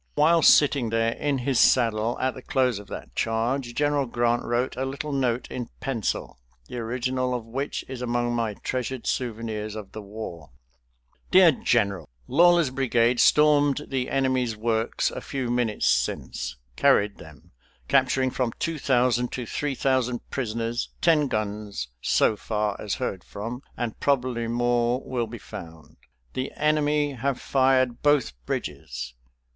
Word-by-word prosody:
While 160 +3 +4
sitting 140 -5 +5
there 115 0 +1
in 145 +3 -1
his 130 -1 0
saddle 115 -2 +3
at 130 0 0
the 130 - -10
close 130 -6 +1
of 105 - -12
that - - -9
charge, 120 +2 -1
General 145 -2 +1
Grant 120 0 +1
wrote 120 +2 -1
a 130 - -2
little 140 +3 -4
note 130 -3 0
in 120 -2 -5
pencil, 125 - -3 0.3
the 125 - -6
original 125 +2 -1
of 120 -2 -5
which 135 +5 -4
is 130 -1 -7
among 120 0 0
my 115 -3 -1
treasured 130 +1 -4
souvenirs 110 -3 -3
of 105 -3 -8
the 110 - -7
war: 100 -7 -8 0.8
"DEAR 185 -2 +7
GENERAL: 100 - 0 0.2
Lawler's 175 -4 +5
brigade 120 -2 +2
stormed 150 -1 +4
the 130 -2 -1
enemy's 130 -4 0
works 110 +1 0
a - - -6
few 130 -3 -3
minutes 120 -3 0
since; 70 - 0 0.2
carried 100 +10 +3
them, 75 -4 -14 0.4
capturing 130 - +2
from 125 -3 -1
two 165 -2 -2
thousand 125 -2 +2
to 125 - -4
three 145 +4 -2
thousand 125 -2 0
prisoners, 115 -1 -2
ten 155 -4 +3
guns, 105 - -3
so 110 - +3
far 105 -1 -2
as 105 - -2
heard 100 -9 -3
from, 115 +5 -6 0.2
and 120 -3 -3
probably 125 -4 0
more 120 +1 +1
will 120 -3 -2
be 120 +2 -8
found. 80 -6 -11 0.4
The 130 +1 -3
enemy 150 -1 +1
have 135 +1 -2
fired 130 -2 +2
both 145 - +3
bridges. 60 -5 -4
120 Hz, 150 wpm, -25 LUFS, 115-135 Hz, 0.8 s, DEAR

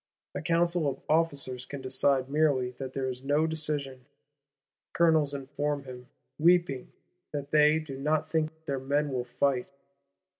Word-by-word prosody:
A - - -4
Council 170 -1 +1
of 135 - -6
Officers 145 -6 +2
can 140 +2 -7
decide 130 0 +1
merely 140 -4 +1
that 130 -1 -6
there 135 -1 -2
is 130 0 -5
no 145 +3 +2
decision: 145 -5 -1 0.9
Colonels 160 -4 +3
inform 145 +1 -3
him, 125 -2 -10 0.3
"weeping," 170 -5 +2 0.4
that 145 -1 -5
they 150 0 +5
do 145 -4 -6
not 155 +2 0
think 160 0 -2
their 140 -1 -2
men 145 +2 0
will 125 -1 -2
fight. 125 0 0
145 Hz, 145 wpm, -28 LUFS, 130-155 Hz, 0.9 s, they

